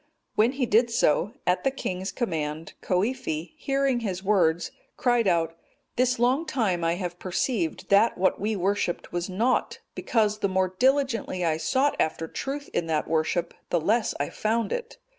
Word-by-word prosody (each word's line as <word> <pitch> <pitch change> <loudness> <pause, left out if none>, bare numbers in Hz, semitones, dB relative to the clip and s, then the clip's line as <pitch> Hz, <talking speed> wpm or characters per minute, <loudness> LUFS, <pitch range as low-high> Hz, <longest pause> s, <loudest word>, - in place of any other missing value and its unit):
When 230 +4 +3
he 270 -2 0
did 235 +2 +3
so, 205 -2 +2
at 180 +1 +1
the 270 - +3
king's 190 -7 -4
command, 160 -8 -3
Coifi, 185 - -1
hearing 275 -4 0
his 190 -5 -3
words, 175 -5 +2 0.3
cried 240 -3 +2
out, 165 -2 +1 0.4
"This 255 0 +2
long 255 +7 +2
time 205 - 0
I 165 +1 +2
have 175 -1 -5
perceived 185 - -2
that 200 +4 +4
what 185 +1 +1
we 215 +1 0
worshipped 195 -1 -1
was 175 +2 -2
naught; 225 +7 0 0.2
because 215 -2 0
the 200 -2 +1
more 185 -1 0
diligently 260 -9 +1
I 160 -1 +1
sought 260 - +1
after 160 +1 0
truth 280 - -5
in 165 - -1
that 155 -2 0
worship, 165 +2 0 0.2
the 175 - +2
less 215 +7 +1
I 145 - -2
found 220 0 0
it. 485 0 -5
200 Hz, 165 wpm, -26 LUFS, 175-245 Hz, 0.4 s, that